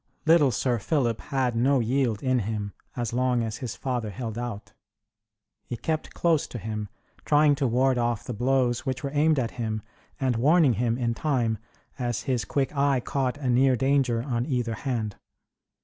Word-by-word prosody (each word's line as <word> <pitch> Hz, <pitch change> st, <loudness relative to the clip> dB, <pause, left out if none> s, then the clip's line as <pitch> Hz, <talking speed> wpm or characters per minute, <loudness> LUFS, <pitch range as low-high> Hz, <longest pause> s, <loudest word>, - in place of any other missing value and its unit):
Little 160 Hz, -3 st, +6 dB
Sir 120 Hz, +1 st, 0 dB
Philip 120 Hz, -2 st, 0 dB
had 130 Hz, -4 st, -1 dB
no 130 Hz, +4 st, +3 dB
yield 120 Hz, -2 st, 0 dB
in 130 Hz, -1 st, +2 dB
him, 105 Hz, -1 st, -3 dB, 0.2 s
as 120 Hz, -2 st, -3 dB
long 125 Hz, -1 st, +1 dB
as 110 Hz, 0 st, -3 dB
his 120 Hz, -3 st, -5 dB
father 125 Hz, -5 st, -2 dB
held 110 Hz, +2 st, -5 dB
out. 110 Hz, -4 st, -6 dB, 0.9 s
He 120 Hz, -, -6 dB
kept 155 Hz, +4 st, -3 dB
close 165 Hz, -4 st, +2 dB
to -, -, -7 dB
him, 105 Hz, -1 st, -4 dB, 0.3 s
trying 150 Hz, 0 st, +4 dB
to 135 Hz, -2 st, +1 dB
ward 125 Hz, +2 st, +2 dB
off 120 Hz, -2 st, 0 dB
the 125 Hz, -, -5 dB
blows 125 Hz, +1 st, +1 dB
which 130 Hz, -2 st, -3 dB
were 140 Hz, -, -2 dB
aimed 155 Hz, +1 st, +3 dB
at 120 Hz, -4 st, 0 dB
him, 110 Hz, -2 st, -2 dB, 0.4 s
and 130 Hz, -3 st, +1 dB
warning 150 Hz, +2 st, +4 dB
him 115 Hz, +2 st, 0 dB
in 120 Hz, -2 st, 0 dB
time, 120 Hz, -5 st, 0 dB, 0.4 s
as 120 Hz, -2 st, -2 dB
his 125 Hz, -4 st, -1 dB
quick 140 Hz, +1 st, -1 dB
eye 140 Hz, -1 st, +3 dB
caught 130 Hz, +1 st, -1 dB
a 140 Hz, -3 st, -4 dB
near 130 Hz, +1 st, +4 dB
danger 130 Hz, -2 st, +1 dB
on 120 Hz, -2 st, -2 dB
either 120 Hz, -5 st, -1 dB
hand. 115 Hz, -4 st, -3 dB
125 Hz, 180 wpm, -26 LUFS, 115-135 Hz, 0.9 s, Little